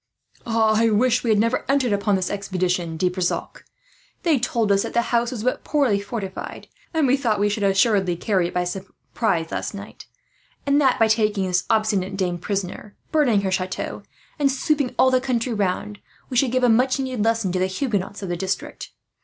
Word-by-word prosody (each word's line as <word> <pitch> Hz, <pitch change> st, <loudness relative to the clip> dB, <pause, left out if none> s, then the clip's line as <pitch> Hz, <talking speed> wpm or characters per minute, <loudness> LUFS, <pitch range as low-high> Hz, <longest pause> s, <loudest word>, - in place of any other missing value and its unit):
"I 225 Hz, 0 st, +3 dB
would 225 Hz, +3 st, +2 dB
we 235 Hz, -, -1 dB
had 215 Hz, -, +4 dB
never 230 Hz, +4 st, +1 dB
entered 270 Hz, -5 st, +2 dB
upon 200 Hz, 0 st, +1 dB
this 185 Hz, -1 st, -1 dB
expedition, 180 Hz, -4 st, -2 dB
De 180 Hz, -, +1 dB
Brissac. 180 Hz, 0 st, -3 dB, 0.6 s
They 320 Hz, -7 st, +3 dB
told 230 Hz, -3 st, 0 dB
us 195 Hz, 0 st, +4 dB
that -, -, -5 dB
the 235 Hz, -, +3 dB
house 235 Hz, 0 st, +2 dB
was 235 Hz, -4 st, -5 dB
but 255 Hz, -, -1 dB
poorly 270 Hz, -9 st, +2 dB
fortified, 200 Hz, -2 st, -6 dB, 0.2 s
and 320 Hz, -3 st, +1 dB
we 260 Hz, 0 st, +4 dB
thought 235 Hz, -7 st, 0 dB
we 205 Hz, 0 st, +2 dB
should 210 Hz, +1 st, -2 dB
assuredly 195 Hz, -2 st, +2 dB
carry 185 Hz, 0 st, 0 dB
it -, -, -9 dB
last 180 Hz, 0 st, 0 dB
night 195 Hz, 0 st, -7 dB, 0.3 s
by 220 Hz, -8 st, +1 dB
surprise; 200 Hz, +5 st, -5 dB, 0.7 s
and 280 Hz, +1 st, +3 dB
that 265 Hz, -3 st, +3 dB
by 225 Hz, -, +4 dB
taking 210 Hz, -3 st, +1 dB
this 180 Hz, -1 st, 0 dB
obstinate 205 Hz, -4 st, +1 dB
dame 180 Hz, -2 st, -1 dB
prisoner, 200 Hz, +2 st, -4 dB, 0.2 s
burning 260 Hz, -10 st, +3 dB
her 190 Hz, -1 st, -1 dB
chateau, 185 Hz, 0 st, -3 dB, 0.4 s
and 280 Hz, -2 st, +3 dB
sweeping 280 Hz, 0 st, 0 dB
all 260 Hz, -, +5 dB
the 255 Hz, -1 st, +3 dB
country 250 Hz, -2 st, -1 dB
round, 205 Hz, +1 st, -2 dB, 0.3 s
we 250 Hz, -, -1 dB
should 250 Hz, -1 st, +3 dB
give 255 Hz, 0 st, +1 dB
a -, -, +6 dB
much 255 Hz, +4 st, +3 dB
needed 255 Hz, -5 st, -2 dB
lesson 225 Hz, -4 st, +1 dB
to 185 Hz, -, -1 dB
the 185 Hz, -, +2 dB
Huguenots 205 Hz, -1 st, -3 dB
of 190 Hz, -, -4 dB
the 175 Hz, -, -1 dB
district. 190 Hz, +2 st, -4 dB
210 Hz, 195 wpm, -22 LUFS, 190-245 Hz, 0.7 s, a